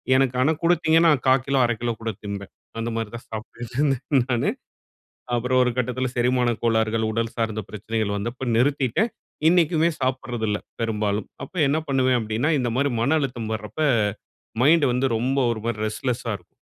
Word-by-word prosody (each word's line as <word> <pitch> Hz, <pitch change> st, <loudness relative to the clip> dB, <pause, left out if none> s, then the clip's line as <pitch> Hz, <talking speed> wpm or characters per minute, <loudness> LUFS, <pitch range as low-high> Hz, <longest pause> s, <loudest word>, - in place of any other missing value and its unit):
எனக்கு 130 Hz, -1 st, +2 dB
ஆனா 145 Hz, +5 st, +4 dB
குடுத்தீங்கன்னா 165 Hz, -1 st, +4 dB, 0.2 s
1/4 130 Hz, 0 st, +4 dB
கிலோ 135 Hz, -1 st, +1 dB
1/2 120 Hz, -, +1 dB
கிலோ 120 Hz, -1 st, 0 dB
கூட 115 Hz, 0 st, -2 dB
திம்பேன். 100 Hz, -1 st, -6 dB, 0.3 s
அந்தமாரி 115 Hz, -1 st, -2 dB
தான் 115 Hz, -, -9 dB
சாப்பிட்டுட்டு 115 Hz, +2 st, -7 dB
இருந்தேன் 135 Hz, -2 st, +2 dB
நானு 120 Hz, -, +1 dB, 0.9 s
அப்புறம் 125 Hz, +2 st, +1 dB
ஒரு 125 Hz, -, +1 dB
கட்டத்தில 125 Hz, +1 st, -1 dB
செரிமான 125 Hz, 0 st, +2 dB
கோளாறுகள், 110 Hz, -1 st, +1 dB
உடல் 115 Hz, +1 st, -2 dB
சார்ந்த 110 Hz, -1 st, -1 dB
பிரச்சனைகள் 110 Hz, 0 st, -2 dB
வந்தப்ப 120 Hz, +5 st, -4 dB
நிறுத்திட்டேன். 140 Hz, -, +2 dB, 0.4 s
இன்னைக்குமே 170 Hz, -1 st, +3 dB
சாப்பிடுறது 130 Hz, -3 st, -1 dB
இல்ல. 105 Hz, -, +1 dB, 0.2 s
பெரும்பாலும். 105 Hz, -2 st, -1 dB, 0.2 s
அப்ப -, -, -20 dB
என்ன 150 Hz, +3 st, +2 dB
பண்ணுவேன் 130 Hz, -2 st, +3 dB
அப்பிடின்னா 110 Hz, +7 st, 0 dB
இந்த 120 Hz, -2 st, -1 dB
மாதிரி 140 Hz, 0 st, +2 dB
மன 140 Hz, +7 st, +3 dB
அழுத்தம் 120 Hz, -6 st, -3 dB
வர்றப்ப, 110 Hz, +8 st, -6 dB, 0.8 s
மைண்ட் 155 Hz, +2 st, +5 dB
வந்து 130 Hz, +2 st, +1 dB
ரொம்ப 130 Hz, +4 st, 0 dB
ஒரு 110 Hz, -2 st, -4 dB
மாதிரி 110 Hz, -2 st, -2 dB
ரெஸ்ட்லெஸ்‌சா 115 Hz, 0 st, -2 dB
இருக்கும். 90 Hz, -, -30 dB
120 Hz, 160 wpm, -24 LUFS, 110-135 Hz, 0.9 s, மைண்ட்